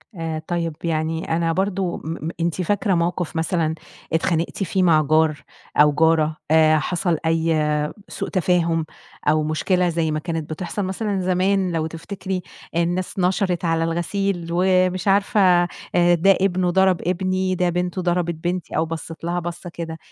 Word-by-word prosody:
آآ 165 Hz, -2 st, -3 dB
طيب، 170 Hz, -2 st, -1 dB
يعني 160 Hz, 0 st, -1 dB
أنا 165 Hz, 0 st, +1 dB
برضه 190 Hz, -1 st, -1 dB
م -, -, -11 dB, 0.3 s
م -, -, -1 dB
أنتِ 170 Hz, +2 st, -1 dB
فاكرة 205 Hz, +3 st, +1 dB
موقِف 175 Hz, 0 st, -1 dB
مثلًا 160 Hz, -1 st, 0 dB, 0.4 s
اتخانقتِ 165 Hz, +3 st, 0 dB
فيه 190 Hz, +1 st, 0 dB
مع 160 Hz, -3 st, +5 dB
جار 155 Hz, -1 st, +2 dB, 0.3 s
أو 150 Hz, 0 st, +6 dB
جارة 155 Hz, 0 st, +2 dB
آآ، 155 Hz, -1 st, +5 dB
حصَل 175 Hz, +1 st, 0 dB
أي 160 Hz, -2 st, +1 dB, 0.3 s
سوء -, -, -4 dB
تفاهم 170 Hz, -3 st, +1 dB, 0.4 s
أو 155 Hz, +1 st, +3 dB
مشكلة 175 Hz, +4 st, +1 dB
زي 165 Hz, -1 st, 0 dB
ما 155 Hz, -, -1 dB
كانت 160 Hz, -1 st, -4 dB
بتحصَل 180 Hz, +5 st, -3 dB
مثلًا 195 Hz, +1 st, -2 dB
زمان 185 Hz, 0 st, +1 dB
لو 160 Hz, -1 st, -1 dB
تفتكري، 185 Hz, +3 st, -5 dB, 0.3 s
الناس 175 Hz, +3 st, -1 dB
نشرِت 180 Hz, -1 st, +1 dB
على 165 Hz, -1 st, +1 dB
الغسيل 175 Hz, +2 st, -1 dB
ومش 185 Hz, +1 st, +2 dB
عارفة 200 Hz, +2 st, +3 dB, 0.5 s
آآ 175 Hz, 0 st, +5 dB
ده 190 Hz, +3 st, +4 dB
ابنه 185 Hz, -2 st, +1 dB
ضرَب 190 Hz, -1 st, +3 dB
ابني، 185 Hz, +1 st, 0 dB
ده 180 Hz, 0 st, +1 dB
بنته 180 Hz, +1 st, -2 dB
ضربِت 175 Hz, -1 st, 0 dB
بنتي 175 Hz, +2 st, -3 dB
أو 160 Hz, -, +2 dB
بَصّت 165 Hz, 0 st, -7 dB
لها 175 Hz, +1 st, -1 dB
بَصّة 175 Hz, +1 st, -6 dB
كده، 165 Hz, -1 st, -6 dB
175 Hz, 155 wpm, -22 LUFS, 160-185 Hz, 0.5 s, أو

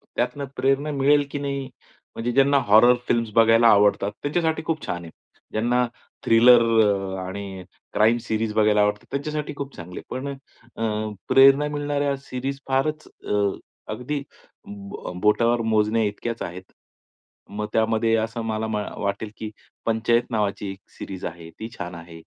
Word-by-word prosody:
त्यातनं 140 Hz, +4 st, -1 dB
प्रेरणा 135 Hz, +3 st, +1 dB
मिळेल 145 Hz, +1 st, +3 dB
की 145 Hz, -, -3 dB
नाही, 140 Hz, -1 st, -3 dB, 0.5 s
म्हणजे 120 Hz, +2 st, -2 dB
ज्यांना 140 Hz, +2 st, +4 dB
हॉरर 110 Hz, +4 st, +7 dB
फिल्म्स 115 Hz, -1 st, +1 dB
बघायला 115 Hz, +1 st, +6 dB
आवडतात 100 Hz, -1 st, +4 dB
त्यांच्यासाठी 160 Hz, +2 st, 0 dB
खूप 160 Hz, -2 st, -2 dB
छान 90 Hz, 0 st, -3 dB
आहे. 85 Hz, -, -10 dB, 0.4 s
ज्यांना 120 Hz, +3 st, +1 dB, 0.4 s
थ्रिलर 120 Hz, +1 st, +7 dB, 0.7 s
आणि 95 Hz, 0 st, -6 dB
अ, -, -, -10 dB, 0.3 s
क्राइम 110 Hz, +2 st, +4 dB
सीरीज 110 Hz, 0 st, -1 dB
बघायला 105 Hz, -1 st, +4 dB
आवडतात 105 Hz, 0 st, 0 dB
त्यांच्यासाठी 150 Hz, +2 st, -3 dB
खूप 140 Hz, -1 st, -6 dB
चांगले 90 Hz, +1 st, -8 dB
आहेत. 130 Hz, -, -4 dB
पण 135 Hz, -, -5 dB, 0.6 s
अ 110 Hz, -1 st, -1 dB, 0.2 s
प्रेरणा 135 Hz, +2 st, +6 dB
मिळणाऱ्या 145 Hz, -1 st, -1 dB
सीरीज 135 Hz, +2 st, -4 dB
फारच, 150 Hz, +3 st, 0 dB, 0.2 s
अ, -, -, -2 dB, 0.6 s
अगदी 140 Hz, +3 st, -3 dB, 0.5 s
ब 205 Hz, -, -8 dB
बोटावर 115 Hz, +3 st, +3 dB
मोजण्याइतक्याच 110 Hz, +1 st, 0 dB
आहेत. 90 Hz, +2 st, -7 dB, 0.9 s
मग 105 Hz, +1 st, -4 dB
त्यामध्ये 115 Hz, 0 st, +2 dB
असं 115 Hz, +1 st, -6 dB
मला 110 Hz, +1 st, -2 dB, 0.3 s
वाटेल 100 Hz, +2 st, -2 dB
की 110 Hz, -1 st, -6 dB, 0.3 s
पंचायत 115 Hz, +1 st, +2 dB
नावाची 105 Hz, -2 st, -1 dB
एक 95 Hz, -, -10 dB, 0.2 s
सीरीज 95 Hz, -2 st, -7 dB
आहे 85 Hz, -1 st, -7 dB
ती 110 Hz, -, -5 dB
छान 90 Hz, 0 st, -6 dB
आहे, 85 Hz, 0 st, -11 dB
115 Hz, 140 wpm, -24 LUFS, 105-140 Hz, 0.9 s, हॉरर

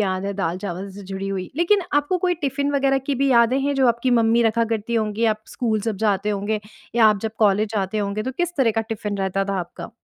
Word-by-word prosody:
याद 190 Hz, -1 st, -1 dB
है 200 Hz, -, -2 dB
दाल-चावल 190 Hz, +1 st, -3 dB
से 200 Hz, +1 st, -10 dB
जुड़ी 195 Hz, +1 st, -5 dB
हुई। 190 Hz, -2 st, -4 dB
लेकिन 370 Hz, +4 st, +3 dB
आपको 290 Hz, +5 st, +2 dB
कोई 360 Hz, 0 st, +1 dB
टिफ़िन 280 Hz, +1 st, 0 dB
वग़ैरह 275 Hz, -1 st, +2 dB
की 285 Hz, -, 0 dB
भी 275 Hz, -, +3 dB
यादें 235 Hz, +2 st, +4 dB
हैं, 285 Hz, +1 st, 0 dB
जो 265 Hz, -2 st, +3 dB
आपकी 235 Hz, +2 st, +1 dB
मम्मी 230 Hz, +1 st, +3 dB
रखा 230 Hz, +1 st, +2 dB
करती 220 Hz, +2 st, -4 dB
होंगी 220 Hz, 0 st, 0 dB
आप 215 Hz, -, -24 dB
स्कूल 220 Hz, -4 st, -1 dB
जब 215 Hz, -1 st, -2 dB
जाते 205 Hz, +1 st, +1 dB
होंगे 205 Hz, +1 st, -1 dB, 0.3 s
या 230 Hz, -2 st, +6 dB
आप 210 Hz, -2 st, +4 dB
जब 220 Hz, -, -2 dB
कॉलेज 210 Hz, 0 st, +3 dB
जाते 200 Hz, +1 st, -1 dB
होंगे? 205 Hz, +1 st, -2 dB
तो 260 Hz, -, -4 dB
किस 350 Hz, +4 st, -2 dB
तरह 260 Hz, -4 st, +3 dB
का 225 Hz, +1 st, 0 dB
टिफ़िन 215 Hz, -2 st, -4 dB
रहता 195 Hz, 0 st, 0 dB
था 195 Hz, -1 st, -2 dB
आपका? 170 Hz, +6 st, -8 dB
220 Hz, 240 wpm, -22 LUFS, 200-260 Hz, 0.3 s, या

